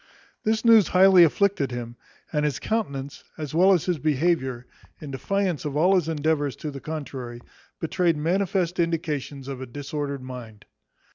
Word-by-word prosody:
This 220 +1 0
news 225 -4 +7
highly 185 -1 +7
afflicted 170 -3 +2
him, 120 -1 -6 0.4
and 150 -1 +1
his 145 -5 0
countenance, 140 - -3
as 155 -1 -6
well 185 +4 +5
as 180 -5 +2
his 180 -4 -1
behaviour, 135 -4 0 0.3
in 150 -3 -8
defiance 185 +5 -1
of 145 -1 -3
all 180 +5 +4
his 175 -4 +2
endeavours 150 -2 0
to 150 - -6
the 135 -1 -8
contrary, 135 -6 -6 0.4
betrayed 170 0 +1
manifest 180 +2 0
indications 150 -5 -2
of 135 -2 -6
a 130 - -6
disordered 140 +1 -5
mind. 120 -5 -9
150 Hz, 155 wpm, -25 LUFS, 135-180 Hz, 0.4 s, news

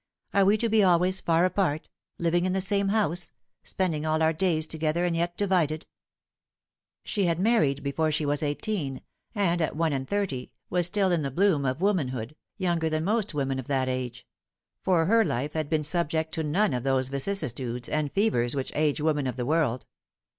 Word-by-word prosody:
" - - -43
Are 200 -1 +4
we 205 +2 +4
to 230 - 0
be 220 -1 +3
always 185 +1 +3
far 170 +1 +3
apart 180 -5 0 0.3
living 175 +1 +1
in 185 - 0
the 190 - +1
same 200 +1 +2
house, 195 -5 0 0.3
spending 165 -5 -2
all 155 0 +1
our 160 0 +3
days 160 -2 +1
together, 160 +2 -1
and 175 -1 0
yet 175 +1 -1
divided 175 -6 +1 0.6
?" - - -67
She 200 -4 0
had 170 -1 0
married 185 - +2
before 155 +3 0
she 155 0 0
was 145 0 +1
eighteen, 145 -2 -2 0.3
and 175 -4 +1
at 160 - -1
one 160 -1 +1
and 135 -1 -3
thirty 190 -12 -2 0.2
was 175 -1 +3
still 195 0 +2
in 170 -3 +1
the 140 - -2
bloom 165 -1 +2
of 130 +6 -2
womanhood, 140 - -1 0.2
younger 170 -4 0
than 155 0 -1
most 210 -2 0
women 135 -2 -1
of 130 - -7
that 135 -2 0
age; 125 -1 -4 0.6
for 175 -4 +2
her 225 +5 +4
life 145 - -2
had 155 -2 -2
been 155 -2 +1
subject 160 0 0
to 160 - -2
none 160 +3 +1
of 125 - -1
those 130 0 +1
vicissitudes 135 - -1
and 150 -2 -1
fevers 135 - +1
which 135 -2 -3
age 150 -1 +1
women 150 -3 +1
of 125 - -3
the 125 -2 -3
world. 145 -4 0
160 Hz, 195 wpm, -27 LUFS, 140-185 Hz, 0.6 s, Are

